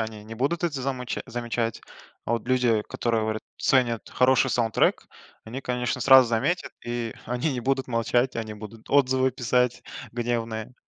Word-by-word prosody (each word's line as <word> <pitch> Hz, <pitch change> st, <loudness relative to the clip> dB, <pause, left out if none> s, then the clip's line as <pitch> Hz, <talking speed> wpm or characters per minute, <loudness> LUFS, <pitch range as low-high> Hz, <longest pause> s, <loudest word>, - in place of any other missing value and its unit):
они 110 Hz, -1 st, -5 dB
не 110 Hz, +1 st, -8 dB
будут 145 Hz, +9 st, -1 dB
это 145 Hz, -6 st, -1 dB
замыч 125 Hz, -2 st, -3 dB
замечать. 120 Hz, -1 st, -2 dB, 0.4 s
А -, -, -1 dB
вот 115 Hz, 0 st, -2 dB
люди, 125 Hz, -4 st, +2 dB
которые, 115 Hz, -2 st, 0 dB
говорят, 110 Hz, 0 st, -2 dB
ценят 120 Hz, -4 st, +1 dB
хороший 130 Hz, +1 st, +3 dB
саундтрек, 115 Hz, -2 st, +1 dB, 0.4 s
они, 120 Hz, +5 st, -6 dB
конечно, 125 Hz, 0 st, -2 dB
сразу 130 Hz, -1 st, +7 dB
заметят, 140 Hz, +11 st, 0 dB
и 120 Hz, -1 st, -3 dB
они 125 Hz, +5 st, -1 dB
не 125 Hz, -, -3 dB
будут 135 Hz, +2 st, 0 dB
молчать, 120 Hz, +2 st, +1 dB
они 110 Hz, -2 st, -4 dB
будут 110 Hz, +1 st, -11 dB
отзывы 130 Hz, -2 st, +3 dB
писать 125 Hz, -1 st, 0 dB, 0.3 s
гневные. 115 Hz, -1 st, -3 dB
120 Hz, 155 wpm, -26 LUFS, 115-130 Hz, 0.4 s, сразу